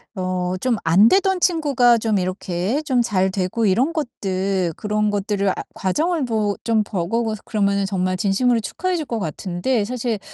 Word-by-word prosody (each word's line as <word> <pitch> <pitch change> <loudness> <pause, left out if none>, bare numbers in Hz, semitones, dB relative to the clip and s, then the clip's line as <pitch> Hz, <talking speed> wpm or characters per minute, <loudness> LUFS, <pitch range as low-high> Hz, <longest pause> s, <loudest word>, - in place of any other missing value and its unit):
어 185 -1 -2
좀 250 -3 +1
안 180 +7 +5
되던 380 -1 +2
친구가 280 -9 +3
좀 215 -2 0
이렇게 185 - -2
좀 255 -4 +1
잘 190 -5 +1
되고 190 +4 -1
이런 235 - +2
것들 195 - -2
그런 210 0 -1
것들을 200 -1 0
아 - - +1 0.2
과정을 310 - 0
보 215 -4 0
좀 225 -2 +2
보고 205 +4 -2
고 220 -1 -2
그러면은 200 -2 +1
정말 185 -1 -1
진심으로 230 +5 +2
축하해 365 - -2
줄 315 - -3
것 230 -2 -2
같은데 185 - -2
사실 235 -1 -2
210 Hz, 315 characters per minute, -21 LUFS, 190-245 Hz, 0.2 s, 안